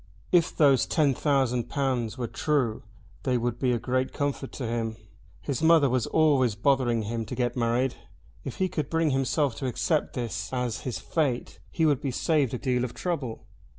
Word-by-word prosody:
If 175 -1 +3
those 140 -5 +4
ten 150 -4 +2
thousand 130 -4 +1
pounds 130 -5 -1
were 125 - -2
true 125 -4 0 0.4
they 130 -2 +1
would 120 0 -2
be 130 -2 +2
a 120 - +2
great 130 +2 -1
comfort 140 -1 -2
to 130 - -4
him. 115 -1 -2 0.5
His 140 -2 -2
mother 160 -5 +5
was 125 -3 +1
always 140 -8 +3
bothering 120 -1 +2
him 115 +2 -3
to - - -5
get 120 -1 -1
married. 120 +1 +1 0.5
If - - -6
he 190 - +1
could 155 -6 -3
bring 165 -2 +1
himself 135 +1 +1
to 135 - -3
accept 150 +5 0
this 115 -4 -4
as 125 -3 -2
his 120 - -3
fate 140 -7 -2
he 165 - 0
would 145 -4 +2
be 140 - -2
saved 140 -1 +1
a - - -2
deal 125 -1 0
of 125 -1 -4
trouble. 140 -12 -3
130 Hz, 185 wpm, -27 LUFS, 120-145 Hz, 0.5 s, mother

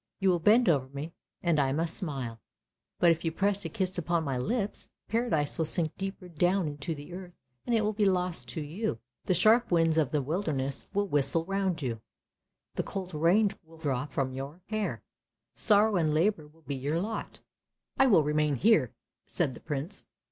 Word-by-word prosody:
You 195 -1 +3
will 175 - +1
bend 220 +8 +5
over 140 -6 +3
me 140 +5 -7 0.3
and 170 -4 +2
I 135 -2 +2
must 160 +3 -1
smile, 130 -9 -4 0.6
but 170 - +5
if 165 0 -1
you 165 - 0
press 200 +3 0
a - - -2
kiss 185 -1 -2
upon 170 0 0
my 140 -3 -2
lips, 205 - -2 0.2
Paradise 220 -12 0
will 160 - +2
sink 160 0 -1
deep 195 +1 -4 0.2
down 180 0 +3
into 145 +2 -4
the 145 +4 -10
earth, 180 -1 -8 0.3
and 235 - +2
it 225 - +3
will 210 0 0
be 210 0 +1
lost 180 -10 -1
to 140 +7 -4
you. 155 - -3 0.3
The 185 - +2
sharp 220 +7 +4
winds 165 -2 +3
of 150 -5 +3
the 150 - +1
wilder 160 +4 -1
ness 135 0 -3
will 205 0 0
whistle 145 +1 +1
round 190 -4 -1
you, 115 -4 -3 0.7
the - - -1
cold 185 -2 -6
rain 180 +7 +3
will 165 0 -17
drop 145 -3 -2
from 130 -1 -1
your 140 +6 -7
hair. 215 -1 -2 0.5
Sorrow 210 -1 +5
and 155 -3 +1
labour 165 -2 +1
will 160 +2 -24
be 140 0 -4
your 140 +5 -1
lot." 215 +5 -5 0.3
" - - -49
I 270 - +6
will 195 -10 +5
remain 150 0 +1
here! 155 - +3 0.2
" - - -61
said 130 - 0
the - - -10
Prince. 150 +8 -4
165 Hz, 200 wpm, -29 LUFS, 145-195 Hz, 0.7 s, I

